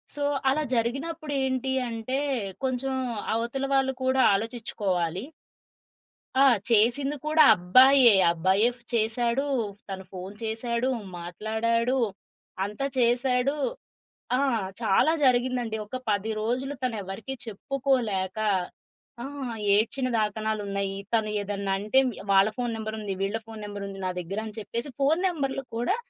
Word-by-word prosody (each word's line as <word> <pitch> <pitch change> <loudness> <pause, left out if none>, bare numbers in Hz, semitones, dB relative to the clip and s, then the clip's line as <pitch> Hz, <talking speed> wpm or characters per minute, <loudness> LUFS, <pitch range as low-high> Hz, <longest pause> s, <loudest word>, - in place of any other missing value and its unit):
So 290 - -3 0.3
అలా 305 +3 +1
జరిగినప్పుడు 285 +7 -2
ఏంటి 265 0 -1 0.2
అంటే 230 +4 -3 0.5
కొంచెం 265 +1 -1 0.4
అవతల 235 +4 -1
వాళ్ళు 265 0 +3
కూడా 260 0 +3
ఆలోచిచ్చుకోవాలి. 195 -5 -2 1.1
ఆ! - - +5 0.3
చేసింది 240 +6 +3
కూడా 310 0 +5
అబ్బాయే 255 +6 +7 0.2
అబ్బాయే 190 +7 +3 0.3
చేశాడు. 235 +4 +1 0.4
తను 190 -1 -5
ఫోను 190 +2 -8
చేశాడు, 235 +3 -1 0.3
మాట్లాడాడు, 220 +7 -1 0.7
అంతా 210 +7 -4
చేసాడు, 250 +3 +2 0.8
ఆ! - - +1 0.4
చాలా 225 +9 +4
జరిగిందండి. 245 -2 +2
ఒక 235 - -5
10 205 +2 0
రోజులు 255 +6 -1
తనెవరికీ 225 +2 -4
చెప్పుకోలేక 225 -5 -1 0.8
ఆ! - - -5 0.5
ఏడ్చిన 245 +5 0
దాకనాలున్నాయి. 205 -2 -2 0.2
తను 220 -2 +2
ఏదన్నంటే 200 +4 +1 0.3
వాళ్ళ 195 +2 +6
ఫోను 245 -2 -2
నంబర్ 220 0 -4
ఉంది, 200 -2 -3
వీళ్ళ 200 +3 0
ఫోను 220 -1 -9
నంబర్ 205 -1 -6
ఉంది 195 0 -8
నా - - 0
దగ్గర 190 +4 -5
అని 215 - -8
చెప్పేసి, 235 +6 -5
ఫోను 305 +5 +3
నంబర్లు 275 -6 -2
కూడా 245 - +1
230 Hz, 115 wpm, -26 LUFS, 205-265 Hz, 1.1 s, అబ్బాయే